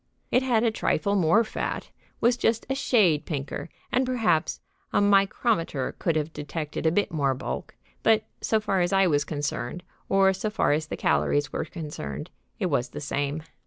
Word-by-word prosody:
It 250 - +4
had 240 -4 +2
a 230 - +3
trifle 200 -1 0
more 185 +3 +4
fat, 215 - -4 0.3
was 240 +1 +4
just 230 -2 +1
a 270 - 0
shade 210 - +3
pinker, 145 +1 -4 0.2
and 255 - +3
perhaps 225 -10 +1 0.3
a - - +3
micrometer 195 - +2
could 165 - +1
have 155 +1 -1
detected 150 +2 -3
a - - +4
bit 205 +4 +1
more 140 -4 +1
bulk; 130 - -5 0.3
but, 220 -1 +4 0.2
so 220 - +2
far 195 -3 0
as 175 - +1
I 195 0 +4
was 145 -5 +2
concerned 145 +2 -3 0.3
or 195 0 +4
so 195 +3 -2
far 210 -6 +1
as 155 +1 0
the - - -5
calories 145 0 +1
were - - -2
concerned, 150 - -6 0.3
it - - -1
was 125 +1 0
the - - -7
same. 145 +1 -2
175 Hz, 180 wpm, -26 LUFS, 150-215 Hz, 0.3 s, It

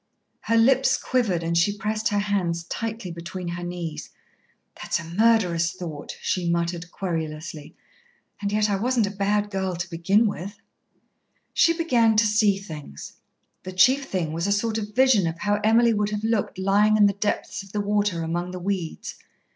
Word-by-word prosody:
Her 230 - +2
lips 265 +3 +4
quivered, 215 -10 0
and 165 0 -1
she 200 +5 +2
pressed 215 +2 -1
her 205 - 0
hands 190 -5 -1
tightly 220 0 -5
between 170 +1 -6
her 175 +1 -5
knees. 175 -3 -5 0.7
"That's - - -1
a - - -7
murderer's 175 -2 +2
thought," 165 -5 -7
she 175 -2 -1
muttered 170 +1 -1
querulously. 160 -4 -5 0.7
"And 200 0 -2
yet 210 0 +2
I 200 -1 0
wasn't 240 +1 +1
a 200 - -4
bad 205 +1 0
girl 190 -2 -2
to 175 0 -4
begin 195 +7 +2
with." 200 0 -4 1.0
She 335 - +4
began 240 -10 +3
to 220 - +5
see 210 -1 +3
things. 155 - -9 0.5
The 185 - -8
chief 260 +9 +4
thing 175 - -2
was 170 +3 -2
a - - 0
sort 220 +2 0
of 210 -1 -7
vision 255 -9 +4
of 165 0 -4
how 205 +3 0
Emily 230 +2 +4
would 210 -1 0
have 210 0 -4
looked 220 -3 -1
lying 205 +3 +3
in 210 - +6
the 200 - +3
depths 205 0 -2
of 195 -1 -14
the 210 - -2
water 205 -4 0
among 175 +2 -2
the 180 0 -6
weeds. 180 -3 -4
200 Hz, 180 wpm, -24 LUFS, 170-215 Hz, 1.0 s, in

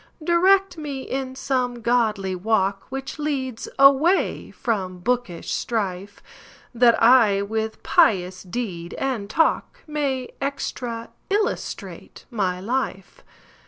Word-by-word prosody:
Direct 365 +2 +3
me 285 -3 -5
in 260 -1 -4
some 250 -3 -1
godly 215 -6 +1
walkWhich 215 - -1
leads 265 -6 -3
away 275 +7 +4
from 195 -7 -3
bookish 215 -2 -2
strife, 200 -3 -3 0.5
That 235 -1 +4
I 225 -4 +5
with 220 +1 -3
pious 190 - +3
deed 180 -4 -5
and 245 -7 -2
talkMay 295 - -1
extra 245 -4 -4 0.2
illustrate 420 +3 -3
my 190 -5 -1
life. 205 -3 -3
240 Hz, 95 wpm, -23 LUFS, 200-275 Hz, 0.5 s, I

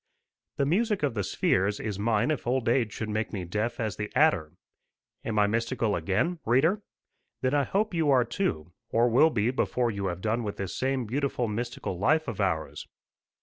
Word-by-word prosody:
The 140 - +2
music 205 +4 +1
of 140 -4 +1
the 105 -3 -1
spheres 100 +1 +1
is 105 -3 -4
mine 110 +6 +1
if 145 -5 -3
old 125 0 0
age 115 -2 +2
should 110 - -4
make 110 0 -2
me 95 -4 -4
deaf 105 +8 -2
as 110 -3 -2
the 105 0 -4
adder. 85 - +3 0.7
Am 110 - -3
I 105 - +5
mystical 115 0 0
again, 100 - 0
reader? 155 - +3 0.6
Then 130 +1 +1
I 145 -1 +3
hope 210 - 0
you 165 -3 +1
are 130 -3 +4
too, 90 - -2 0.2
or 120 +1 +3
will 130 +7 +5
be 115 -3 +1
before 125 -2 0
you 100 -2 -3
have 90 0 -4
done 115 +3 0
with 105 -2 -4
this 95 -3 -4
same 130 -1 -1
beautiful 130 0 -1
mystical 110 -4 -4
life 155 +8 +2
of 110 -4 -3
ours. 80 -5 -2
115 Hz, 190 wpm, -28 LUFS, 105-135 Hz, 0.7 s, I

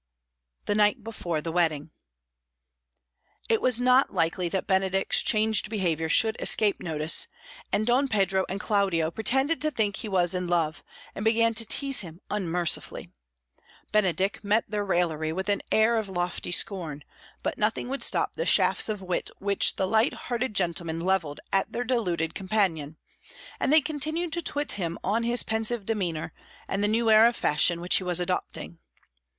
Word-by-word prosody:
The - - 0
Night 210 +3 +2
before 175 -8 -4
the 165 - -4
Wedding 160 -3 0 1.6
It 225 - +1
was 250 -2 +2
not 250 +2 +3
likely 170 +2 -1
that 190 +2 -2
Benedick's 190 -1 +2
changed 215 -1 +2
behaviour 170 -7 -1
should 220 +6 +3
escape 210 -2 +2
notice, 155 -1 0 0.4
and 205 +2 0
Don 250 +4 +2
Pedro 195 -4 +1
and 195 - -3
Claudio 190 -7 0
pretended 265 - +1
to 310 - +2
think 215 -8 -1
he 215 - -5
was 180 -2 +2
in 180 -1 -2
love, 165 -3 -1 0.3
and 205 - -6
began 230 +1 +3
to 225 0 +2
tease 275 +1 +1
him 170 -4 -5
unmercifully. 175 -4 -1 0.8
Benedick 195 -1 0
met 210 +2 +1
their 210 -1 -2
raillery 165 -5 -1
with 190 +4 -3
an 200 - +1
air 225 +1 +3
of 210 -3 -5
lofty 175 -1 -3
scorn, 170 -6 -1 0.4
but - - -3
nothing 215 +3 -1
would 275 +2 -4
stop - - +2
the 485 - -3
shafts - - +3
of 210 -3 -4
wit 180 -1 -2
which 200 0 +1
the 190 - 0
light 220 +6 +1
hearted 245 -2 -4
gentlemen 170 -3 -1
levelled 170 -5 -1
at 195 - +1
their 245 - -2
deluded 180 -10 -1
companion, 185 -7 -1 0.6
and - - 0
they 310 +1 +6
continued 315 +3 -2
to 340 - -1
twit 290 -2 -1
him 170 -4 -2
on 210 +5 0
his 235 +1 +1
pensive 220 0 -1
demeanour, 180 -8 -2 0.3
and 200 - -2
the - - +3
new 225 +1 +1
air 220 +1 +7
of 235 - -1
fashion 170 +3 +2
which 175 - +3
he - - -3
was 180 -1 0
adopting. 175 - -4
200 Hz, 165 wpm, -26 LUFS, 175-225 Hz, 1.6 s, air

